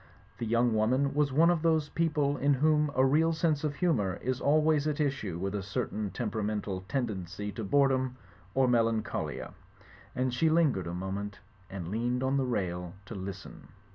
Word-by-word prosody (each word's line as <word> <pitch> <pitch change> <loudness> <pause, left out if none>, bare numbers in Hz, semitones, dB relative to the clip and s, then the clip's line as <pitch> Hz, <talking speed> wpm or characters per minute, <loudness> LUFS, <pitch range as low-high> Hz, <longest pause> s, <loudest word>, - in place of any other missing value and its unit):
The 115 - -2
young 115 +1 +2
woman 130 +6 +2
was 145 -1 +2
one 165 +6 +5
of 170 -3 0
thosd 160 -2 +1
people 150 -4 +1
in 140 0 +2
whom 150 +2 +3
a 130 - +4
real 160 +5 +3
sense 160 -2 0
of 150 -2 -1
humour 120 - +1
is 130 +1 -1
always 155 0 +3
at 150 - 0
issiue 135 - -1
with 95 +2 -3
a 105 - -2
certain 100 +2 -3
temperamental 105 -3 -3
tendency 105 -6 -3
to 110 - -6
boredom 130 +2 +2 0.4
or 135 -1 +4
melancholia; 115 -2 0 0.6
and 130 -1 0
she 160 +6 +2
lingered 150 - +2
a 85 - -4
moment, 95 +1 -4 0.3
and 90 -3 -6
leaned 120 +4 -1
on 135 +1 +1
the 135 - +1
rail 90 -6 -2
to 110 - -8
listen. 95 0 -8
125 Hz, 170 wpm, -30 LUFS, 100-145 Hz, 0.6 s, one